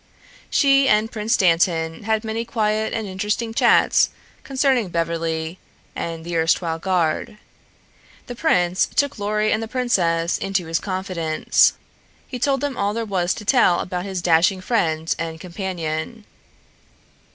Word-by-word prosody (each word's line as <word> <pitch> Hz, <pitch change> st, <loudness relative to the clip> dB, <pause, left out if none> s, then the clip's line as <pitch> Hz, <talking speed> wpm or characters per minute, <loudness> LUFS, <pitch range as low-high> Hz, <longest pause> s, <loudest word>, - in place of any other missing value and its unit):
She 275 Hz, -1 st, +4 dB
and 215 Hz, +1 st, +2 dB
Prince 220 Hz, 0 st, 0 dB
Dantan 165 Hz, -1 st, +1 dB
had 220 Hz, 0 st, 0 dB
many 225 Hz, +1 st, -3 dB
quiet 220 Hz, -2 st, -1 dB
and 225 Hz, -1 st, -3 dB
interesting 210 Hz, +4 st, -2 dB
chats -, -, +4 dB, 0.3 s
concerning 265 Hz, -6 st, +1 dB
Beverly 165 Hz, 0 st, -2 dB, 0.4 s
and 165 Hz, -1 st, -5 dB
the 170 Hz, 0 st, -4 dB
erstwhile 165 Hz, 0 st, +1 dB
guard. 180 Hz, +2 st, -1 dB, 0.9 s
The 245 Hz, -, -7 dB
prince 185 Hz, -, +1 dB
took 285 Hz, -5 st, -1 dB
Lorry 210 Hz, +1 st, 0 dB
and 220 Hz, -, +1 dB
the 225 Hz, -, -4 dB
princess 175 Hz, -9 st, 0 dB
into 195 Hz, -2 st, -1 dB
his 165 Hz, 0 st, -1 dB
confidence. 185 Hz, -5 st, +1 dB, 0.5 s
He 250 Hz, -, -6 dB
told 270 Hz, +1 st, +1 dB
them 285 Hz, -3 st, -3 dB
all 205 Hz, +1 st, -1 dB
there 230 Hz, 0 st, -2 dB
was 185 Hz, -3 st, 0 dB
to 210 Hz, -, -9 dB
tell 200 Hz, -8 st, +4 dB
about 180 Hz, 0 st, -4 dB
his 190 Hz, -3 st, -4 dB
dashing 170 Hz, +3 st, +3 dB
friend 165 Hz, -7 st, 0 dB
and 165 Hz, -1 st, -4 dB
companion. 180 Hz, +3 st, -5 dB
190 Hz, 140 wpm, -21 LUFS, 165-225 Hz, 0.9 s, She